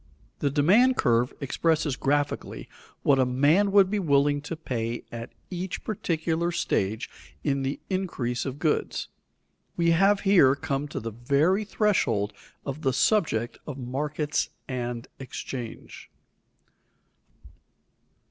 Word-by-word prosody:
The 145 - +1
demand 200 - +4
curve 120 0 +2
expresses 155 +1 +1
graphically 145 +2 -1 0.4
what 135 -2 +4
a - - +5
man 145 +11 +3
would 195 -1 +5
be 210 - +1
willing 145 -4 +2
to 150 +3 -5
pay 120 -7 -3
at 115 0 -7 0.2
each 180 +1 -4
particular 165 -4 -1
stage 110 - -1 0.4
in 140 -2 0
the 135 +1 -2
increase 170 -11 -2
of 135 0 -4
goods. 155 0 -1 0.7
We 170 -1 +3
have 195 +4 +4
here 175 -10 +5
come 140 +1 -2
to 145 - -5
the 115 0 -5
very 140 - +2
threshold 125 - +1 0.3
of 140 +2 -4
the 135 -3 +1
subject 125 - +1
of 145 -3 -5
markets 145 +4 -2 0.2
and 120 -2 -4
exchange. 130 -2 -7
145 Hz, 120 wpm, -26 LUFS, 125-170 Hz, 0.7 s, a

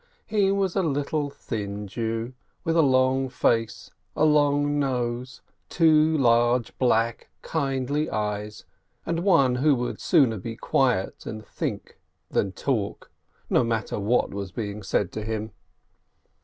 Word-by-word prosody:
He 200 -3 +2
was 195 -3 0
a 195 - +2
little, 145 -1 -1
thin 105 -7 -5
Jew 115 +3 -3 0.3
with 165 - 0
a 165 - +6
long 130 -1 +2
face, 115 -2 0 0.2
a 155 - +3
long 145 -1 +3
nose, 125 -2 -2 0.3
two 160 -1 +4
large, 120 -2 +2
black, 115 -2 +1
kindly 140 0 -1
eyes, 105 0 -3 0.4
and 165 0 -1
one 165 -9 +4
who 145 +2 +4
would 120 -1 -4
sooner 115 -7 +3
be 115 +4 -6
silent 125 -9 0
and 110 0 -6
think - - -5 0.3
than 100 - 0
talk, 110 -6 -3 0.4
no - - +3
mat 115 -2 -1
ter - - -3
what 110 +5 +1
was 100 -2 -5
being 105 +1 -5
said 100 -1 -1
to 110 - -5
him. 110 0 -4
125 Hz, 140 wpm, -25 LUFS, 110-145 Hz, 0.4 s, a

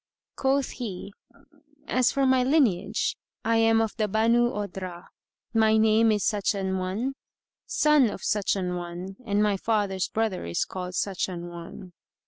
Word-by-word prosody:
Quoth 270 0 +1
he 205 -5 -6 0.7
"As 255 -1 +2
for 275 -1 +1
my 260 -1 +4
lineage, 250 - +1 0.3
I 230 0 +3
am 225 0 +4
of 225 -1 -1
the 215 -2 +1
Banú 230 +3 +3
Odhrah; 190 -3 -6 0.5
my 220 -1 +4
name 220 +1 +4
is 210 -3 0
such 205 0 +1
an 190 -1 -1
one, 200 +9 -2 0.5
son 300 -6 +4
of 205 - -7
such 210 -2 +1
an 180 -2 -2
one 175 +2 -7
and 205 0 +2
my 205 -2 +2
father's 200 -3 0
brother 220 -4 -1
is 85 0 -1
called 180 -1 -6
such 195 0 -1
an 175 -1 -6
one." 175 +2 -10
210 Hz, 155 wpm, -26 LUFS, 185-225 Hz, 0.7 s, my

